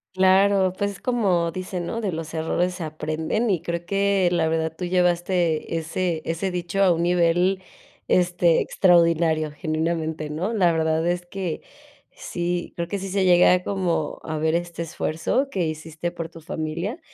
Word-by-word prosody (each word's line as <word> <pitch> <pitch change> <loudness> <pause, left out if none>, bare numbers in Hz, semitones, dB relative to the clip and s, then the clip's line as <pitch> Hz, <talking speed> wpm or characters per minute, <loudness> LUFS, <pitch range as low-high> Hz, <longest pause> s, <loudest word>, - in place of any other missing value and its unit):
Claro, 190 0 +4
pues, 200 +1 -1
es 195 - -11
como 190 -9 +1
dice: 185 +1 -5
¿no? 225 +7 -3
"De 200 -4 -1
los 160 -1 -6
errores 175 +3 -1
aprenden", 155 +8 -2
y 175 -4 0
creo 170 0 -4
que 200 0 +2
la 165 -2 +2
verdad 160 0 -1
tú 180 - -4
llevaste 175 -2 +1
ese 165 0 -2
ese 165 +4 -2
dicho 180 +2 -2
a 190 - +5
un 170 0 +1
nivel, 180 +2 +2 0.5
este, 175 -2 +3
extraordinario, 165 -3 +3
genuinamente, 160 -1 -2
¿no? 180 +8 -2
La 180 -6 +3
verdad 160 0 +1
es 175 0 -1
que 180 -3 -4 0.5
sí, 175 0 -4
creo 170 0 -3
que 200 - -3
sí 195 0 -5
se 195 0 +1
llega 180 0 +5
como 175 -6 -1
a 155 -1 -4
ver 160 +1 +1
este 170 -1 -3
esfuerzo 165 - -1
que 180 -7 0
hiciste 160 +2 -5
por 165 -2 -5
tu 165 0 -13
familia, 165 - -4
175 Hz, 165 wpm, -23 LUFS, 160-185 Hz, 0.5 s, a